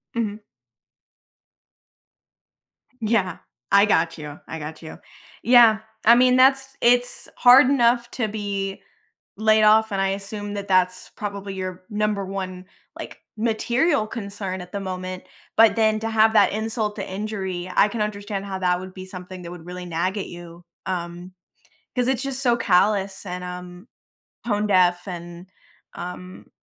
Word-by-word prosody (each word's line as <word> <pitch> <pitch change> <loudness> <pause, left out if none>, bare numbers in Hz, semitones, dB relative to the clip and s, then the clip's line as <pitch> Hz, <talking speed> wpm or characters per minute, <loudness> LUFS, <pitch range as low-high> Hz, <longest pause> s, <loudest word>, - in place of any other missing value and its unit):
Mhm. 215 -2 -3 2.6
Yeah. 210 -5 0 0.3
I 200 +1 +6
got 165 -5 +1
you. 150 -1 -8
I 160 - -6
got 155 +2 -8
you. 160 - -9 0.5
Yeah. 235 -2 +6 0.3
I 235 +2 +8
mean, 250 +1 +5
that's 270 +1 +3
It's 245 +1 +2
hard 250 +1 +7
enough 240 -3 +2
to 240 -4 -1
be 200 -2 -4 0.6
laid 215 0 +4
off, 220 +1 +5
and 195 - -1
I 195 - +1
assume 205 +1 -4
that 200 0 -5
that's 185 -1 +1
probably 200 -1 -5
your 185 -1 -6
number 210 -1 -1
1, 185 -1 -6 0.3
like, - - -8 0.2
material 235 +5 +1
concern 200 -4 -5
at 180 0 -11
the 200 - -4
moment, 185 -1 -5 0.3
but 225 0 +6
then 220 -1 +2
to 225 - -2
have 220 0 +4
that - - +5
insult 215 0 -2
to 195 - -5
injury, 190 -3 -4
I 210 - +5
can 215 +1 -4
understand 205 -1 -3
how 190 -1 -5
that 180 -1 +1
would 185 0 -9
be 185 0 -9
something 185 0 -9
that 170 - -8
would 175 -2 -10
really 180 0 -7
nag 175 +4 -2
at - - -4
you, 175 0 -11 0.2
um, 175 0 -5 0.6
'cause 250 0 +1
it's 260 -1 0
just 275 -1 -2
so 240 -3 +3
callous 195 -1 +1
and, 180 0 -5
um, 180 +3 -9 0.6
tone 210 -1 0
deaf 180 -1 +3
and, 175 0 -8 0.5
um 180 +1 -8
200 Hz, 155 wpm, -23 LUFS, 180-220 Hz, 2.6 s, I